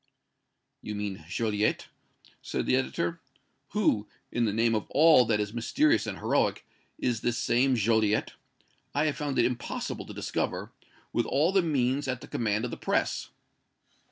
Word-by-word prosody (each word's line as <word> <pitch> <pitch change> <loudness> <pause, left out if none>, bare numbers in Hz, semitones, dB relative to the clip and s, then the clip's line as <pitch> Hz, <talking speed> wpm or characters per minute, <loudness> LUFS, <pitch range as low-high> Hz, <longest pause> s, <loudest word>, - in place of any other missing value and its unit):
"You 105 - -5
mean 100 -4 -4
Joliette?" 105 +1 0 0.6
said - - -3
the - - +3
editor. 165 +5 -1 0.5
"Who, 115 - +2 0.2
in 120 -1 +1
the 105 - +1
name 115 +2 +2
of 110 -2 -1
all 155 -4 +6
that 110 -1 +1
is 105 0 -2
mysterious 290 - +2
and - - -4
heroic, - - 0 0.3
is 120 -3 -1
this 120 -1 0
same 130 +2 +2
Joliette? 110 -1 +2 0.6
I 145 +2 +2
have 150 - 0
found 145 -2 -2
it 120 - +4
impossible 125 0 -3
to - - -8
discover, - - -3 0.4
with 120 - +1
all 155 +6 +2
the 195 -1 +4
means 140 -3 0
at 125 -2 -2
the - - -10
command 110 0 -1
of 125 - -4
the - - -5
press." - - -1
120 Hz, 160 wpm, -28 LUFS, 110-145 Hz, 0.6 s, all